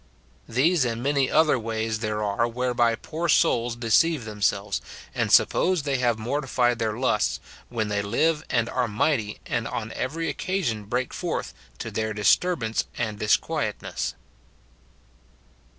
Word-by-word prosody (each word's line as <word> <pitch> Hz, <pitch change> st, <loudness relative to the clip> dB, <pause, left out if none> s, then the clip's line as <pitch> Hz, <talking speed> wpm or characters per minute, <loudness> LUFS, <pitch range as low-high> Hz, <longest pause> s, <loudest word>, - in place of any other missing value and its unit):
These 145 Hz, +7 st, +3 dB
and 115 Hz, -1 st, -2 dB
many 140 Hz, -1 st, +2 dB
other 155 Hz, -4 st, +4 dB
ways 110 Hz, -1 st, -2 dB
there 110 Hz, -1 st, -2 dB
are 105 Hz, +3 st, +1 dB
whereby 120 Hz, -1 st, +1 dB
poor 165 Hz, +8 st, -4 dB
souls 120 Hz, -4 st, +3 dB
deceive 120 Hz, +4 st, +2 dB
themselves, 105 Hz, -1 st, -1 dB, 0.3 s
and -, -, -1 dB
suppose 180 Hz, -4 st, +4 dB
they 140 Hz, -2 st, 0 dB
have 120 Hz, -3 st, +2 dB
morti 135 Hz, +6 st, -2 dB
fied 120 Hz, -2 st, +2 dB
their 110 Hz, -1 st, -1 dB
lusts, 125 Hz, -4 st, +1 dB, 0.3 s
when 110 Hz, -3 st, -2 dB
they 100 Hz, -1 st, 0 dB
live 150 Hz, +10 st, +1 dB
and 115 Hz, -2 st, +1 dB
are 125 Hz, 0 st, 0 dB
mighty, 105 Hz, 0 st, 0 dB
and 115 Hz, -1 st, -2 dB
on 110 Hz, -1 st, -4 dB
every 165 Hz, +6 st, -3 dB
occasion 145 Hz, -, -2 dB
break 125 Hz, +4 st, -2 dB
forth, -, -, -3 dB, 0.2 s
to -, -, -5 dB
their 110 Hz, 0 st, -2 dB
disturbance 110 Hz, -, +2 dB
and 110 Hz, -3 st, -2 dB
dis 110 Hz, -, +4 dB
quietness. -, -, -3 dB
120 Hz, 145 wpm, -25 LUFS, 110-140 Hz, 0.3 s, other